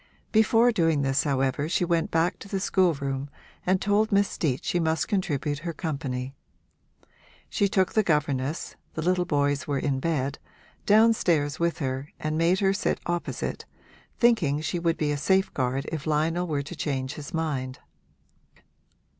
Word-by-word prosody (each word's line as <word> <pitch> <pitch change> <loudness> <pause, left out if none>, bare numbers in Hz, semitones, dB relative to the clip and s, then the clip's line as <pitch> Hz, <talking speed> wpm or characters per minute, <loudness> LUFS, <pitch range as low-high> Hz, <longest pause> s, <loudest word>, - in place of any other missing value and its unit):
Before 225 +2 +4
doing 165 -8 +2
this 135 +2 +1
however 135 +1 0
she 175 0 +1
went 170 -1 +1
back 165 +3 +1
to - - -10
the 195 - -1
schoolroom 145 -8 0 0.4
and 185 +1 +3
told 205 +2 +2
Miss 200 0 +4
Steet 135 -6 -2
she 175 - +1
must 160 -1 0
contribute 150 - -1
her 170 +2 -4
company. 135 -5 -4 1.2
She 200 - +1
took 190 -2 +1
the 215 - +4
governess 150 -5 -1 0.2
(the 160 - -2
little 180 +1 +2
boys 145 -3 0
were 145 -1 0
in 135 -1 0
bed) 140 -2 -1 0.5
downstairs 200 -9 +3
with 170 0 0
her 135 -1 -3
and 155 0 -2
made 170 +4 +2
her 195 0 +3
sit 195 - -1
opposite, 175 0 -3 0.5
thinking 205 - +3
she 160 +3 -2
would 170 -1 0
be 150 -1 0
a 145 - -1
safeguard 140 -6 0
if 155 -2 -4
Lionel 165 +4 +1
were 145 -3 -1
to 160 +5 -8
change 135 -3 -2
his 150 +2 -8
mind. 145 -6 -2
160 Hz, 155 wpm, -26 LUFS, 140-180 Hz, 1.2 s, Before